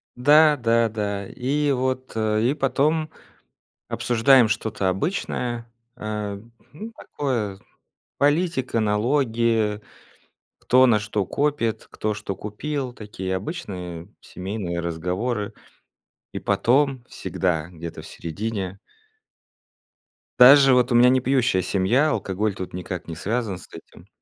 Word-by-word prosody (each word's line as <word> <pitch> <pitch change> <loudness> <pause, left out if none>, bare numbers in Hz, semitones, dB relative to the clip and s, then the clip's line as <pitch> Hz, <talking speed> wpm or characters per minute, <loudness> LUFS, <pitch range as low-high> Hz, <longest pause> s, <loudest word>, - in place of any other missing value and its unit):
Да, 150 +4 +5
да, 115 -1 +2
да. 100 -2 -3
И 140 +3 -1
вот, 130 0 -1
э, 110 -1 +1
и 130 +4 +2
потом 150 +3 0 0.8
обсуждаем 120 0 +4
что-то 105 -3 -1
обычное, 120 - -3 0.3
э, 105 -2 -4 0.3
ну, 215 +10 -8
такое 115 -9 -3
з - - -22 0.6
политика, 145 -4 +1
налоги, 110 -1 +1 0.8
кто 130 +1 +4
на 110 -3 +4
что 105 -1 -2
копит, 140 -3 -1
кто 110 0 -2
что 100 -2 -5
купил, 130 +6 -4
такие 95 -4 -5
обычные 90 - -6
семейные 90 -2 -5
разговоры. 90 +7 -3 0.8
И - - -4
потом 135 0 +1
всегда 85 -3 -2
где-то 85 -1 -8
в - - -12
середине 95 +2 -5 1.6
Даже 135 +1 +9
вот 125 0 +3
у 120 - +3
меня 125 +1 +7
не 130 - +4
пьющая 125 -7 +2
семья, 100 - +2
алкоголь 100 -4 -1
тут 95 -2 -7
никак 90 -1 -6
не 80 - -6
связан 105 +1 -2
с - - -13
этим, 80 - -14
115 Hz, 120 wpm, -23 LUFS, 100-130 Hz, 1.6 s, Даже